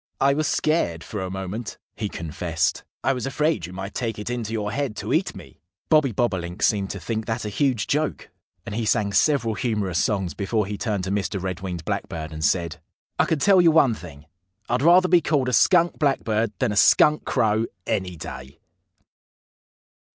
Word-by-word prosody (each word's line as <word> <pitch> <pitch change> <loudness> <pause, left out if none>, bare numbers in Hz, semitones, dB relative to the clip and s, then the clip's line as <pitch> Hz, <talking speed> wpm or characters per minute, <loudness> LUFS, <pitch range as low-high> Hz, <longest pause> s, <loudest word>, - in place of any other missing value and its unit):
"I 140 +1 +4
was 155 +1 0
scared, 120 - 0
for 105 - -5
a 95 - -3
moment," 95 +4 -5 0.2
he 105 - -3
confessed. 85 -1 -2 0.2
"I 135 - +2
was 125 0 -3
afraid 150 - 0
you 90 - -11
might 95 +2 -6
take 115 -3 -3
it 105 +3 -5
into 115 -3 -3
your 105 -2 -2
head 140 -4 -2
to - - -3
eat - - 0
me." - - -13 0.3
Bobby 150 -5 +4
Bobolink 95 -5 -2
seemed 100 -2 +2
to 100 - -5
think 110 +6 -4
that 115 0 -2
a - - -2
huge 125 -1 0
joke. 150 +1 -2 0.3
And - - -6
he 115 +2 -2
sang 105 -2 +1
several 120 0 +2
humorous 100 -6 -1
songs 95 -5 -1
before 105 +1 -1
he 105 +1 -4
turned 100 -2 -2
to 95 - -3
Mr. 100 0 -1
Red 95 -1 -4
winged 90 -3 -5
Blackbird 80 -1 -4
and 80 0 -5
said: 85 -1 0 0.4
"I - - +5
can 160 - 0
tell 190 +5 +5
you 170 - +6
one 155 -6 +4
thing. 80 -7 -11 0.4
I'd 125 - 0
rather 175 +4 +6
be 175 -1 +5
called 140 -4 +1
a - - -3
Skunk 175 +3 +4
Blackbird 115 -7 +1
than 125 -5 0
a - - -3
Skunk 150 +8 +5
Crow, 110 0 +1 0.2
any 90 -2 -2
day!" 70 -2 -9
105 Hz, 195 wpm, -24 LUFS, 95-135 Hz, 0.4 s, you